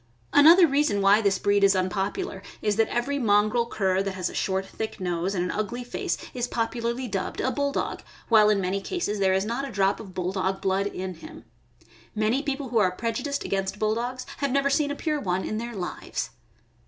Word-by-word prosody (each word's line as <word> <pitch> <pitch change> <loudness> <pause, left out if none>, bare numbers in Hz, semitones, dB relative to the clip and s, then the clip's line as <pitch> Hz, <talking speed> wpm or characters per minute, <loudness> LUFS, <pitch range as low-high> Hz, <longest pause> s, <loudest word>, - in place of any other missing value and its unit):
Another 330 +5 +8
reason 280 -8 +1
why 200 +2 +5
this 200 -2 +2
breed 200 0 +2
is 195 -1 +5
^unpopular 190 +1 -2 0.2
is 210 -1 0
that 225 - +3
every 275 +4 -1
mongrel 215 +1 +3
cur 190 -4 +1
that 195 -1 -3
has 185 -1 -2
a - - -12
short, 190 0 -1
thick 220 +2 -6
nose 180 +1 -1
and 175 - 0
an 180 - -2
ugly 215 +4 -3
face 245 - -3 0.2
is 245 -1 -2
popularly 235 +2 -2
dubbed 195 -4 -3
a 260 - +1
Bulldog, 285 0 -1
THE - - -16
BULLDOG. - - -24
603 - - -33
while 215 -2 +6
in 205 -2 +2
many 190 +2 -1
cases 215 - -2
there 190 -1 +3
is 190 +1 +1
not 240 +5 -2
a - - -8
drop 195 0 +1
of 190 -4 -10
Bulldog 190 +1 -1
blood 195 +1 0
in 185 -2 -5
him. 315 - -12 0.7
Many 215 +5 +1
people 280 -2 -3
who 230 -2 +2
are 190 -3 +4
prejudiced 230 +8 -3
against 195 0 -2
Bulldogs 235 +4 -1
have 280 0 -1
never 280 +1 +2
seen 290 0 +2
a 285 - -2
pure 305 0 -1
one 185 -5 -1
in 215 - -3
their 235 0 -5
lives. 180 -3 -4
215 Hz, 215 wpm, -26 LUFS, 195-250 Hz, 0.7 s, Another